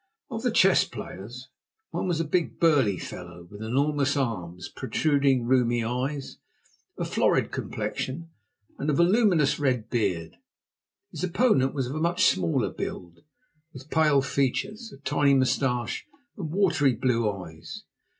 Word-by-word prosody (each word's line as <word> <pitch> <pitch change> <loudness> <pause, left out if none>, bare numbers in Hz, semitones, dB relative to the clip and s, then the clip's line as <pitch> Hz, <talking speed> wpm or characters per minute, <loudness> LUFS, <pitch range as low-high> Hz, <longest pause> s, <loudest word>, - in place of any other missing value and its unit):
Of 225 -1 -4
the 245 - +1
chess 195 -4 +5
players, 120 +4 -9 0.4
one 170 - -2
was 170 -3 0
a - - +1
big, 165 +2 -1
burly 140 - +3
fellow, 90 -1 -9
with 105 +1 -10
enormous 140 +5 +1
arms, 90 -9 -3
protruding 135 0 +1
rheumy 120 -2 +2
eyes, 130 +4 -3 0.6
a - - -2
florid - - +1
complexion, 165 +5 -4 0.5
and 145 - -1
a - - +2
voluminous 175 - +3
red 125 -6 0
beard. 90 -9 -1 0.7
His 160 - -6
opponent 170 - +2
was 135 -3 0
of 125 - -5
a 155 - -3
much 170 +1 +2
smaller 85 -3 +1
build, 85 -1 -6 0.5
with 135 +3 -12
pale 150 -4 +4
features, 200 - -1
a - - -13
tiny 145 -1 +3
moustache, 130 - 0 0.3
and 175 -8 -5
watery 165 -9 +2
blue 115 -4 +1
eyes. 80 -5 -9
135 Hz, 140 wpm, -26 LUFS, 115-160 Hz, 0.7 s, chess